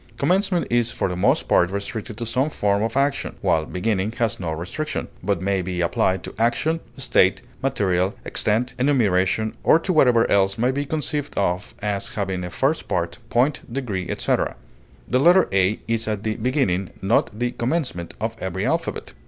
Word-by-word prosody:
Commencement 185 -1 +2
is 120 -1 +2
for - - -1
the 90 - -3
most 90 - +2
part 90 - +4
restricted 100 +3 -5
to 120 - -3
some 130 +6 +1
form 100 -7 +1
of 115 +3 -1
action, 140 +1 0
while 80 -1 +1
beginning 100 +1 -1
has 115 -2 -1
no 90 -3 -3
restriction, 90 - -4
but 95 -1 -1
may 100 -1 +1
be 90 0 -4
applied 90 +2 +1
to - - -7
action, 135 +8 +1 0.2
state, 125 -5 +2 0.2
material, 100 -6 +1
extent, 115 +4 0
enumeration, 110 -6 +2
or - - +6
to 180 +3 -1
whatever 125 -7 +5
else 95 -1 +2
may 125 +3 +2
be 140 +2 -2
conceived 150 -1 -2
of 90 0 -1
as 100 -2 -1
having 95 -5 -3
a 90 - -4
first 135 - 0
part, 85 +4 -2
point, 130 +4 +2
degree, 110 -9 -3
etc. - - 0 0.5
The 125 - +2
letter 175 +6 +6
A 95 +2 +2
is 115 -1 0
at 105 -2 -2
the 110 -1 -1
beginning 110 -7 0
(not 105 +1 +1
the 120 +1 0
commencement) 125 - -2
of 110 +1 -2
every 95 -2 -3
alphabet. - - -2
110 Hz, 175 wpm, -23 LUFS, 95-130 Hz, 0.5 s, or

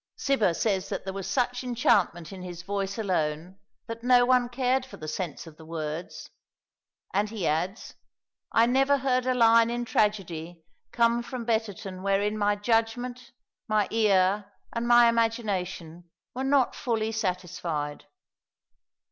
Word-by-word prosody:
Cibber 215 -11 +1
says 195 -4 0
that - - -4
there 190 - -5
was 195 -1 -5
such 250 -1 0
enchantment 200 -9 +1
in 190 - -9
his 175 -1 -8
voice 200 +1 -3
alone 180 -3 -2 0.3
that 230 0 -7
no 245 -1 +5
one 250 -1 +3
cared 255 +1 +1
for 260 - -11
the 155 - -8
sense 165 +1 -4
of 160 -2 -13
the 160 - -13
words; 160 0 -6 0.8
and 205 +2 +1
he 210 -5 -4
adds, 175 +8 -2 0.6
"I 230 - +5
never 270 +3 +3
heard 255 -1 0
a 255 - +2
line 230 -1 +5
in 240 0 -2
tragedy 175 -7 -1 0.3
come 235 0 +2
from 240 -1 -6
Betterton 210 -4 -2
wherein 200 +2 +1
my 205 -1 +1
judgment, 235 +3 -1 0.4
my 215 -2 +2
ear, 200 -2 +2 0.2
and 235 0 -2
my 240 0 +7
imagination, 190 -7 -1 0.2
were 260 - -3
not 270 -2 +3
fully 225 -2 -1
satisfied." 180 -7 -3
210 Hz, 145 wpm, -27 LUFS, 185-240 Hz, 0.8 s, my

